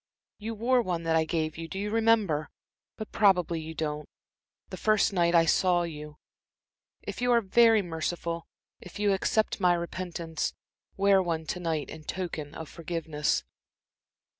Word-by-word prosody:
You 225 +2 -5
wore 245 +3 +3
one 175 -6 -2
that 165 0 +1
I 160 0 +3
gave 155 -1 -2
you 165 - -5
do 190 - -7
you 205 +1 -2
remember? 220 -9 +2 0.5
but 215 - -7
probably 180 -5 +3
you 160 +1 -7
don't 150 -1 -3 0.6
the - - -4
first 215 -1 +2
night 170 -2 +2
I 165 -1 +6
saw 175 +2 +3
you. 150 -2 -7 0.9
If - - -6
you 245 0 +2
are 235 - +6
very 225 +1 +4
merciful, 170 0 -3 0.3
if 180 - -11
you 205 -1 +2
accept 215 +3 0
my 180 -2 +4
repentance, 170 -2 -4 0.4
wear 195 0 +5
one 165 -3 -2
to 180 - -3
night 165 -4 -2
in 160 - -9
token 160 -4 -5
of 160 - -7
forgiveness." 160 -3 -2
175 Hz, 160 wpm, -28 LUFS, 160-200 Hz, 0.9 s, I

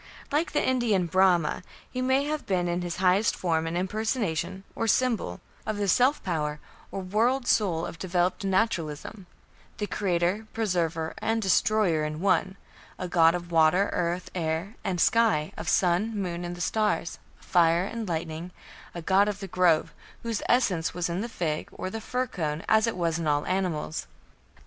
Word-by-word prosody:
Like 300 +4 +1
the 295 - +1
Indian 235 -8 +2
Brahma, 180 -2 +3 0.3
he 255 - -3
may 260 +2 +2
have 305 0 -3
been 180 -2 +1
in 175 +1 -1
his 175 -1 -3
highest 190 +3 +3
form 165 -2 0
an 165 +1 -2
impersonation, 190 -2 -2
or 225 - -2
symbol, 225 - +1 0.2
of 215 -1 -3
the 205 -1 -1
"self 255 +9 +3
power" 150 -4 -2 0.3
or 195 - -5
"world 230 +7 +1
soul" 175 -8 +2
of 165 - -8
developed 180 +1 0
Naturalism 190 -2 -1 0.5
the 210 - -2
"creator", 190 +1 0
"preserver", 170 -7 -1
and 225 0 0
"destroyer" 195 -4 +2
in 150 0 -3
one, 190 +1 +1 0.4
a 185 - -4
god 165 -1 +4
of 175 -1 -6
water, 165 +4 +4
earth, 175 +1 -2
air, 170 +4 -2
and 180 -2 -2
sky, 215 -8 +3
of 170 - -4
sun, 195 +5 +2
moon, 175 -2 -3
and 175 0 -4
stars, 210 -5 0 0.2
fire 170 0 +3
and 220 -1 -5
lightning, 160 +1 -3 0.5
a 170 - -5
god 195 +3 +4
of 205 -2 -2
the 195 - -6
grove, 175 -3 +2 0.3
whose 230 -2 -2
essence 190 -10 +2
was 175 -1 -1
in 170 +3 -2
the 235 - -4
fig, 160 -8 -3
or 185 - -5
the 225 - -5
fir 250 +4 -1
cone, 160 -7 -3
as 220 +1 +4
it 225 - -2
was 170 -1 0
in 165 - -2
all 145 0 +1
animals. 180 -5 -2
185 Hz, 170 wpm, -27 LUFS, 170-215 Hz, 0.5 s, god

